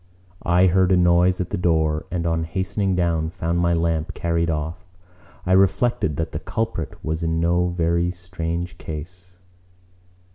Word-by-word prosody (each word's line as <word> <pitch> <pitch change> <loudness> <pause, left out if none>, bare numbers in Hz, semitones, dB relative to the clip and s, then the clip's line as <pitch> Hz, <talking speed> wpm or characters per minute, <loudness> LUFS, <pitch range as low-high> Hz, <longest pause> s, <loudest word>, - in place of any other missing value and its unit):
I 90 +2 +3
heard 95 +1 +3
a 95 - +5
noise 90 +1 +4
at 90 -1 -3
the - - -2
door 80 -2 +1
and 85 -1 -2
on 80 -1 0
hastening 95 +3 -1
down 85 -3 0
found 85 +1 -2
my 85 0 +2
lamp 80 -1 -1
carried 85 0 0
off. 80 +3 -3 0.6
I 90 - -1
reflected 95 - +2
that 80 -1 -2
the - - -4
culprit 110 -8 -3
was 80 +1 -2
in 80 0 0
no 85 +1 +2
very 85 0 +1
strange 85 -1 -5
case. 90 +4 -9
85 Hz, 155 wpm, -22 LUFS, 80-90 Hz, 0.6 s, a